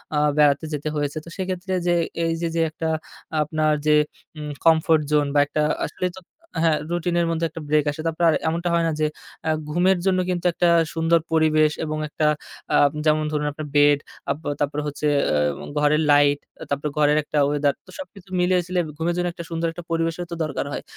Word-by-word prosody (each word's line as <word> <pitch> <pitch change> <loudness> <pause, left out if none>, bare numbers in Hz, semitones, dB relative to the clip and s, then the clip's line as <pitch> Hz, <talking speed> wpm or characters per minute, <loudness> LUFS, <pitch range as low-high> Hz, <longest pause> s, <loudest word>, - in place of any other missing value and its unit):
আ - - +2 0.2
বেড়াতে 145 +1 +4
যেতে 150 +1 -2
হয়েছে। 145 +1 -2
তো 170 - -10
সেক্ষেত্রে 185 0 -3
যে, 175 - +3 0.3
এই 165 - +1
যে, 170 - 0
যে 165 - +2
একটা 160 +1 -3 0.5
আপনার 155 0 +1
যে 150 - +6 0.4
উম 150 -1 -5
comfort 160 -1 +4
zone 145 -1 +3
বা 145 - +4
একটা 150 +1 -2 0.2
আসলেই 180 +4 -3
তো - - -9 0.4
হ্যাঁ, 160 -2 +3
রুটিন 175 0 -1
এর 170 - +1
মধ্যে 165 0 0
একটা 165 - -8
ব্রেক 150 0 +3
আসে। 150 +2 -7
তারপর 165 +1 -2
আর - - +3
এমনটা 170 +2 -1
হয় 170 -1 +2
না - - +1
যে 155 - +2 0.4
অ্যা 160 - 0 0.2
ঘুমের 180 +3 +3
জন্য 185 -1 +3
কিন্তু 180 0 -2
একটা 175 0 +2 0.2
সুন্দর 165 0 +3
পরিবেশ। 155 -1 +3
এবং 155 0 -3
একটা 150 0 0 0.5
আ - - +5 0.3
যেমন 155 0 +3
ধরুন 150 -1 -1
আপনার 150 +1 -7
বেড, 145 0 +5 0.3
আপ - - 0 0.2
তারপরে 145 0 -1
হচ্ছে 150 +1 -2 0.2
অ্যা 75 -1 0
ঘরের 150 +1 +3
লাইট, 145 0 +4 0.2
অ্যা - - -9
তারপর 140 +1 -1
ঘরের 150 0 +4
একটা 150 - -4
ওয়েদার। 145 -1 +1
তো, - - -21
সবকিছু 200 -9 -10
মিলিয়ে-ঝিলিয়ে 180 0 +1
ঘুমের 170 +2 0
জন্য 180 0 0
একটা 170 - -7
সুন্দর 165 0 -1
একটা 175 +1 -9
পরিবেশের 165 +1 -1
তো 170 - -3
দরকার 150 -3 -3
হয়। - - -4
160 Hz, 200 wpm, -23 LUFS, 150-170 Hz, 0.5 s, যে